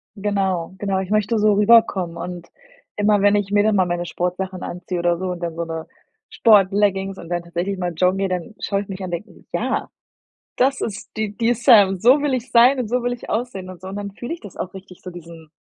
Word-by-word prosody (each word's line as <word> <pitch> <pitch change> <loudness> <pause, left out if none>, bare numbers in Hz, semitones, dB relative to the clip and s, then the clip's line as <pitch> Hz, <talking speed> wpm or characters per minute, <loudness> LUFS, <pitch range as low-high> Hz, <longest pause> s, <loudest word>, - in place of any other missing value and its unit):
Genau, 190 -4 -1
genau, 195 -2 -1
ich 190 0 -4
möchte 215 +1 +1
so 210 0 +4
rüberkommen 205 -5 +3
und 175 0 -7 0.5
immer 205 -1 +2
wenn 205 0 +4
ich 200 -1 -1
mir 205 0 +4
dann 215 -1 +2
mal 185 -2 +3
meine 175 0 -2
Sportsachen 180 +2 -3
anziehe 180 0 -5
oder 170 0 +1
so 185 - -4
und 175 -1 -6
dann 170 -1 -4
so 170 - -2
'ne 165 -1 -5 0.4
Sportleggings 195 -2 +3
und 170 - -10
dann 175 -1 -2
tatsächlich 175 +3 -3
mal 175 -1 -3
joggen 185 +3 +2
gehe, 195 0 0
dann 185 +5 -4
schaue 200 -1 -1
ich 205 - -9
mich 195 -1 -7
an - - -3
und 180 - -6
denke: - - -20
„Ja, - - -1 0.7
das 270 +2 +2
ist 215 -1 -5
die 215 -1 -3
die 235 0 +2
Sam, 210 -6 +5
so 255 +8 +5
will 285 -3 +1
ich 255 0 -4
sein 250 +3 +6
und 240 -4 -2
so 250 +1 0
will 245 0 -1
ich 245 - -8
aussehen“ 220 -5 -3
und 180 -2 -11
so 185 - -8
und 195 - -6
dann 200 -1 -5
fühle 240 +9 -6
ich - - -12
das 205 -4 -12
auch 180 - -5
richtig 190 -1 -12
so 180 - -7
diesen 165 -2 -12
195 Hz, 240 wpm, -21 LUFS, 180-215 Hz, 0.7 s, sein